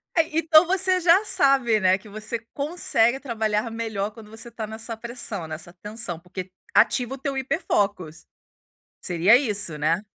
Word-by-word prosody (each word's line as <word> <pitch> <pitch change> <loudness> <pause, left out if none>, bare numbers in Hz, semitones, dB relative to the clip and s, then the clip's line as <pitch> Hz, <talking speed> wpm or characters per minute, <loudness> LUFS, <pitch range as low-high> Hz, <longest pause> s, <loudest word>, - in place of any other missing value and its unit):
É, 325 -1 +1
então 320 +1 +6
você 370 0 +2
já 355 +3 +5
sabe, 275 - +3
né, 185 -1 +3
que 205 +2 -16
você 215 +2 -4
consegue 275 -5 +1
trabalhar 220 -4 -2
melhor 220 -3 -3
quando 215 0 -14
você 225 +2 -9
tá 220 -2 -5
nessa 220 +1 -5
pressão, 230 -6 -4
nessa 160 +2 -7
tensão. 210 -2 -6
Porque 180 +1 -8 0.2
ativa 250 +3 +3
o - - -12
teu 275 0 -4
hiper 270 +6 -2
focus. 185 -6 -1 0.8
Seria 180 +5 +4
isso, 210 - -2
né? 160 +5 +1
225 Hz, 160 wpm, -24 LUFS, 200-270 Hz, 0.8 s, então